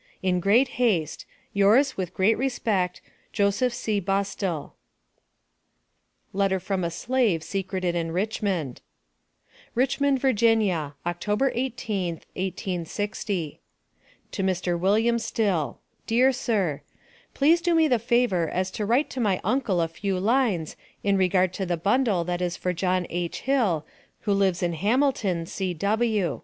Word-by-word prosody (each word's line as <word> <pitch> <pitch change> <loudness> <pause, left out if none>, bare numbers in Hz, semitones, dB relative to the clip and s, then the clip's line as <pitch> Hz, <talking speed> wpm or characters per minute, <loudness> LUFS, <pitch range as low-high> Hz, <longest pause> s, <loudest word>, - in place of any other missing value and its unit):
In 180 -1 +2
great 240 +8 +2
haste, 175 -11 0 0.3
Yours 225 +8 +4
with 185 -3 -4
great 205 +4 +3
respect, 215 -8 -1 0.3
Jos. 200 -2 +2
C. 215 -3 -1
BUSTILL, 195 -4 -2 1.6
LETTER 195 -1 +1
FROM 190 0 -2
A 170 - 0
SLAVE 220 -3 0
SECRETED 190 -2 -2
IN 165 -1 -2
RICHMOND. 185 - -2 0.9
RICHMOND, 270 +3 +2
VA, 270 - +1
Oct. 200 -10 +1
18th, 210 -1 -1
1860. 185 -1 -3 0.7
To - - -3
MR. 180 -2 0
WILLIAM 220 +6 +2
STILL: 195 -10 -1 0.3
Dear 250 +4 +4
Sir 205 - -1 0.5
Please 320 +5 +4
do 345 0 +2
me 320 -1 +5
the 245 -5 +2
favor 235 -8 +1
as 185 +1 -2
to 210 +1 -3
write 250 +7 +2
to 260 - -5
my 200 -6 +1
uncle 235 -9 +1
a 165 - +1
few 185 +3 -3
lines 210 - +1 0.3
in 200 -1 +2
regard 185 -1 +2
to 190 - -3
the 175 -1 0
bundle 205 0 +2
that 175 +1 -3
is 175 -1 -1
for 180 - -1
John 180 +1 0
H. 175 0 -3
Hill, 225 - +1 0.4
who 205 - 0
lives 190 -3 +1
in 175 -1 0
Hamilton, 205 - +1
C.W. 195 - -1
195 Hz, 130 wpm, -25 LUFS, 180-230 Hz, 1.6 s, me